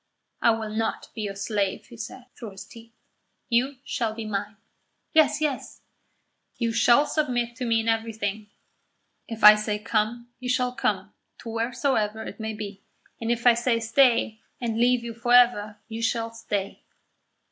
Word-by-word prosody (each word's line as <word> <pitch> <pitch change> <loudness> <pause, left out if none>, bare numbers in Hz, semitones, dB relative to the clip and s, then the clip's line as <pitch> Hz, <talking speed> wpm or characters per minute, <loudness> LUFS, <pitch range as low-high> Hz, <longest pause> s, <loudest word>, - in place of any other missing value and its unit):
"I - - +5
will 220 -1 0
not 220 +1 -2
be 220 - -5
your 200 -2 -4
slave," 200 -1 -2
he 240 - -13
said, 235 +2 -8
through 220 -5 -8
his 195 - -10
teeth. 230 0 -14 0.6
"You 255 +4 +2
shall 235 -5 -2
be 225 -1 -5
mine." 205 +1 -4 0.6
"Yes, 310 -1 +4
yes." 290 -4 -3 0.8
"You 230 -2 0
shall 235 +5 +5
submit 245 -6 -1
to 255 - -3
me 230 -1 +2
in 225 - -6
everything. 220 -2 -2 0.8
If 225 -1 -7
I 210 0 +12
say 210 0 -1
'come,' 220 +3 -1
you 250 0 -5
shall 250 0 +1
come 210 -7 -2 0.2
to 230 - -9
wheresoever 225 -2 -1
it - - -9
may 220 0 -3
be; 205 -2 -7 0.4
and 230 0 -1
if 235 0 -2
I 245 - +8
say 235 0 +1
'stay,' 230 -1 +3 0.2
and 230 -2 -2
leave 245 0 +3
you 235 -1 -5
for 235 +2 -1
ever, 215 -4 +4
you 225 0 -6
shall 230 0 0
stay." 205 -3 -4
230 Hz, 170 wpm, -25 LUFS, 215-245 Hz, 0.8 s, I